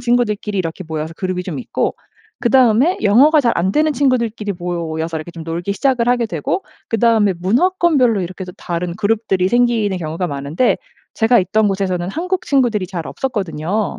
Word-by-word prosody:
친구들끼리 215 -4 0
이렇게 170 +1 -3
모여서 160 0 -4
그룹이 185 -1 -2
좀 175 -7 -5
있고 125 - -2 0.4
그 - - 0
다음에 260 - +4
영어가 280 +9 +5
잘 235 -3 +2
안되는 250 - +1
친구들끼리 235 -7 0
모여서 165 -2 -3
이렇게 160 +2 -6
좀 165 -1 -9
놀기 170 +4 -3
시작을 250 +1 +1
하게 245 -1 +2
되고 170 -1 -2 0.3
그 225 - 0
다음에 220 -3 +3
문화권별로 255 - +2
이렇게 185 +1 -5
또 180 - -9
다른 170 0 -3
그룹들이 200 -2 0
생기는 230 -4 +2
경우가 165 +1 -3
많은데 145 - 0 0.4
제가 235 +2 +4
있던 210 +4 +1
곳에서는 185 -2 -1
한국 365 - -2
친구들이 240 - +1
잘 175 -4 -5
없었거든요. 205 - -2
200 Hz, 415 characters per minute, -18 LUFS, 175-240 Hz, 0.4 s, 영어가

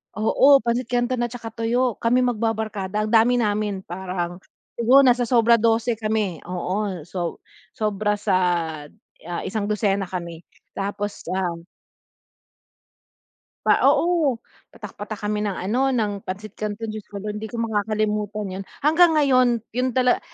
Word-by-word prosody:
Oo, 270 +6 +5
pancit 240 +2 0
canton 245 0 0
at 240 - -6
saka 230 -2 -6
tuyo 235 +1 0
kami 245 +2 +3
mag-babarkada 215 -4 -1
ang - - -4
dami 230 +2 +5
namin 210 -2 -1
parang, 175 -1 -4 0.4
siguro 245 +4 +6
nasa 245 -1 +4
sobra 235 -1 +5
12 230 +1 +2
kami, 215 -6 -1
oo, 185 +1 -3
so 175 -2 -4 0.4
sobra 210 -1 0
sa - - +1 0.9
ah, 175 -1 -3
isangdosena 205 -1 0
kami 170 -3 -6 0.4
tapos, 205 +1 -4
ah 180 -3 -1 2.1
Pa - - +4
oo, 330 -7 +2 0.4
patak-patak 210 0 -8
kami 210 0 -1
ng 200 - -2
ano 245 +9 0
ng 215 -4 0
pancit 200 +2 -6
canton, 215 +1 -4
Diyos 215 -1 -7
ko 205 - -9
lord 210 0 -4
hindi 220 - -5
makakalimutan 210 -3 -2
yun. - - -7 0.2
Hanggang 325 +2 +5
ngayon 260 -4 +4 0.2
yun 250 +1 -1
tala 250 -1 +3
215 Hz, 135 wpm, -23 LUFS, 200-240 Hz, 2.1 s, siguro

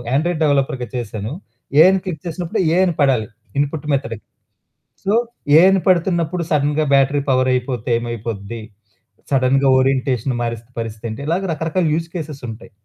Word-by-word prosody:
Android 160 +2 0
డెవలపర్‌గా 135 -4 +1
చేశాను. 110 -1 -4 0.5
ఏ - - +10
అని 190 - +2
click 165 -5 -4
చేసినప్పుడు, 170 0 -3
ఏ - - +2
అని 175 - -1
పడాలి 130 -6 +2 0.3
ఇన్‌పుట్ 145 +1 -2
మెథడ్. 115 -5 -2 0.9
సో, 200 +2 +1 0.4
ఏ - - +8
అని 195 -1 +3
పడుతున్నప్పుడు 175 -1 +1
సడెన్‌గా 150 +1 +2
బ్యాటరీ 140 +1 +3
పవర్ 130 0 +3
అయిపోతే 125 -2 -2
ఏమైపోద్ది, 115 -2 -5 0.7
సడెన్‌గా 135 +1 +3
ఓరియంటేషన్ 130 -1 0
మారిస్తే 115 0 -5
పరిస్థితి 115 0 -6
ఏంటి? 110 - -7
ఇలాగ 180 +4 0
రకరకాల 165 +3 -1
యూజ్ 165 0 -2
కేసెసుంటాయి. 140 -9 -7
140 Hz, 140 wpm, -19 LUFS, 120-160 Hz, 0.9 s, ఏ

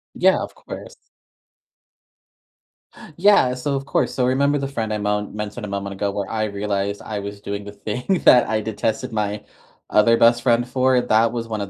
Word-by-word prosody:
Yeah, - - +3
of - - -6
course. - - -10 2.2
Yeah. 185 -9 +4
So, 140 +3 -2
of 135 0 -4
course. - - 0
So, 125 - 0
remember 140 +3 +2
the 135 -1 -2
friend 115 -5 -3
I - - -1
mon 105 0 -2
mentioned 105 +2 -5
a - - -7
moment 100 0 -4
ago, 100 +1 -2
where 100 -1 -4
I 110 -1 -1
realized 100 -1 -3
I 105 -2 -5
was 100 0 -7
doing 100 0 -5
the 100 - -9
thing 125 - -2
that 125 - +7
I 110 -1 0
detested 110 +1 -2
my 105 -1 -2 0.5
other 115 +2 +4
best 120 +1 +4
friend 120 0 +2
for? 130 0 +2
That 115 0 +2
was 115 -1 -4
one 110 -2 -3
of 100 - -5
110 Hz, 190 wpm, -21 LUFS, 105-125 Hz, 2.2 s, that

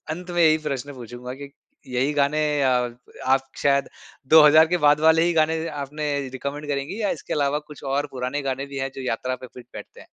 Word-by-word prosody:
अंत 180 +1 -10
में - - +4
यही 155 0 +5
प्रश्न 140 0 -4
पूछूँगा 125 0 -8
कि 140 - -10 0.4
यही 135 +4 +1
गाने 145 +2 +1 0.2
आ 130 -1 +3 0.6
आप 135 0 0
शायद 140 -1 +2 0.5
2000 155 +1 +8
के 180 +1 +1
बाद 145 +1 +5
वाले 160 +1 +5
ही 175 0 +1
गाने 160 +1 +1
आपने 150 +1 -5 0.2
रिकमेंड 140 +3 -6
करेंगी? 145 +10 -3
या 205 - +1
इसके - - -5
अलावा 145 0 +1
कुछ 150 -1 -13
और 140 +2 -1
पुराने 130 +3 -3
गाने 135 0 -3
भी 140 -1 -8
है 135 0 -2
जो 135 - -6
यात्रा 130 +1 -2
पे 130 - -11
फिट 125 - -12
बैठते - - -11
हैं? - - -17
140 Hz, 205 wpm, -23 LUFS, 135-155 Hz, 0.6 s, 2000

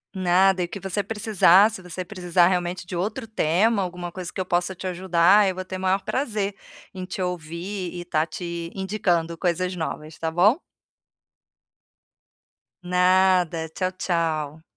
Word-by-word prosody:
Nada, 185 +1 +3
e - - 0
o - - -12
que 200 - -6
você 195 +1 -2
precisar, 210 -2 +4
se 215 -4 -8
você 180 0 -6
precisar 180 -2 +2
realmente 180 0 -2
de 180 - -5
outro 210 +5 -3
tema, 210 +2 +2
alguma 180 -1 -5
coisa 185 0 -6
que - - -6
eu 185 - -1
possa 175 +1 0
te 185 +1 -6
ajudar, 185 +2 +4
eu 190 - 0
vou 185 0 -5
ter 185 0 -5
maior 190 +1 +1
prazer 210 -7 -2 0.4
em 185 - -5
te 185 +1 -5
ouvir 180 +2 -4
e 175 - -6
estar 160 -3 0
te 170 0 -6
indicando 180 -4 -1
coisas 180 +1 -1
novas, 160 -2 -5
tá 160 0 -2
bom? 195 - +4 2.3
Nada, 180 -2 +3
tchau, 185 +3 -2
tchau. 160 -4 -2
180 Hz, 160 wpm, -24 LUFS, 170-190 Hz, 2.3 s, precisar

